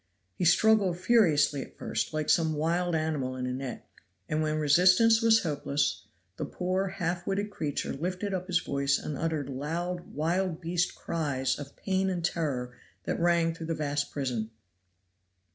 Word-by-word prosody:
He 180 - -2
struggled 195 0 +4
furiously 175 - +3
at - - -11
first, - - -2
like 155 -1 -2
some 160 -2 +3
wild 170 +3 0
animal 150 -5 -1
in 125 0 -3
a 125 - -2
net; 130 -1 -6 0.4
and 155 +1 0
when 155 0 0
resistance 185 - +5
was 225 -1 +5
hopeless 145 - -1 0.3
the - - -3
poor, 185 +2 -1
half 175 -2 -3
witted 200 +1 -1
creature 150 -7 -3
lifted 180 +6 -3
up 185 -1 -3
his 180 -2 +2
voice 140 -1 +1
and 150 - -5
uttered 155 -2 -2
loud, 170 +6 -4
wild 170 +3 0
beast 175 +1 -1
cries 140 -6 -1
of 140 -1 -9
pain 190 0 0
and 175 -3 -1
terror 135 -8 -2 0.3
that - - -2
rang 170 -1 +3
through 165 0 -7
the 165 - -1
vast 145 -1 -1
prison. 125 -6 -3
165 Hz, 160 wpm, -29 LUFS, 145-180 Hz, 0.4 s, resistance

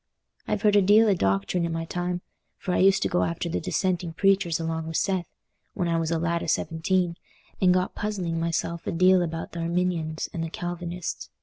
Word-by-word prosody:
I've 210 0 -1
heard 210 -1 +4
a 205 - +6
deal 210 +4 +6
o' 205 - +5
doctrine 100 - 0
i' 170 - 0
my 165 0 -3
time, 175 +1 -3 0.4
for 180 - -3
I - - +2
used 195 +1 +5
to - - +2
go 180 - +1
after 170 +1 -1
the 170 - -2
Dissenting 180 -1 -1
preachers 195 -2 +2
along 160 0 -3
wi' 165 - -5
Seth, 185 0 0 0.5
when 180 -3 -1
I 165 -1 +1
was 165 -1 -1
a 165 - +1
lad 170 +1 0
o' - - -5
seventeen, 170 +1 0 0.4
and 185 -1 +5
got 185 0 +1
puzzling 185 -6 -2
myself 165 0 -2
a - - 0
deal 185 +2 +5
about 165 -1 -3
th' - - -8
Arminians 170 -2 -1
and 165 - -2
the 165 - -3
Calvinists. 175 +1 -5
175 Hz, 210 wpm, -26 LUFS, 165-185 Hz, 0.5 s, a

